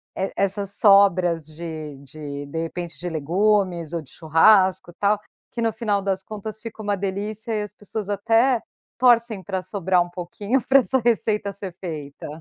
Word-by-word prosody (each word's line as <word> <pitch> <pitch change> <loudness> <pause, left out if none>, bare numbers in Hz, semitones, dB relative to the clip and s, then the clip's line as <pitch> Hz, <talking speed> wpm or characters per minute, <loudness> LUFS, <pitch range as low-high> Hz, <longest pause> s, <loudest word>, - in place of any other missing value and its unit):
e 190 - -2
essas 200 0 -1
sobras 185 -6 +4
de 155 -2 -7
de 145 0 -7
de 160 +3 -4
repente 165 -2 -5
de 175 0 -3
legumes 175 +1 +1
ou 170 - -1
de 130 - -14
churrasco, 185 +2 +4
tal, 205 +1 +2 0.3
que 240 - -7
no 225 -2 +1
final 205 -4 -1
das 190 -1 -1
contas, 215 +1 -7
fica 220 -2 -8
uma 205 0 0
delícia 205 +3 -4
e 210 -1 -1
as 210 -1 -8
pessoas 205 0 -6
até 225 +4 +3 0.4
torcem 235 -4 +4
pra 190 -2 -3
sobrar 185 -1 +1
um 175 - -11
pouquinho 200 +8 -2
pra 270 0 +6
essa 260 +1 +1
receita 215 -3 +1
ser 195 -2 -8
feita? 155 -6 -7
195 Hz, 170 wpm, -23 LUFS, 170-215 Hz, 0.4 s, pra